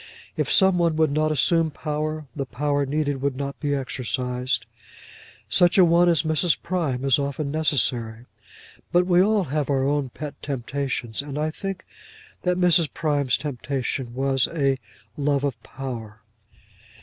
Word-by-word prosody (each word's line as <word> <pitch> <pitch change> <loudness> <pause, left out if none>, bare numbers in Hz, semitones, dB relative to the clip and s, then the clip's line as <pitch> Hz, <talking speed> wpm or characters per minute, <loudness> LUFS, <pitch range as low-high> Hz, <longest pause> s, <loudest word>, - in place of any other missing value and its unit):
If - - -1
some 190 -2 +5
one 170 -2 +2
would 155 -2 +2
not 155 +1 +1
assume 165 +2 +3
power, 155 +1 -3
the 135 -3 -3
power 145 +2 -1
needed 145 -1 -1
would 140 -1 0
not 140 0 -4
be 145 -2 0
exercised. 125 -1 -2 0.8
Such 175 +1 +4
a 185 - +8
one 170 +1 +4
as 165 -4 +3
Mrs. 160 +1 +2
Prime 155 -8 -1
is 135 +1 +4
often 140 +1 -2
necessary. 125 -7 0 0.7
But 175 +1 +4
we 180 0 +4
all 210 +1 +3
have 150 -2 -2
our 135 -2 +2
own 140 -1 0
pet 150 +3 -7
temptations, 130 -3 -3
and 145 0 -6
I 155 +1 0
think 195 +2 -6 0.6
that 180 0 0
Mrs. 175 -5 +4
Prime's 145 -5 +1
temptation 130 -3 -4
was 135 -1 +1
a 140 -5 0 0.4
love 145 -1 +1
of 130 -5 -2
power. 115 -6 -7
145 Hz, 150 wpm, -24 LUFS, 135-160 Hz, 0.8 s, a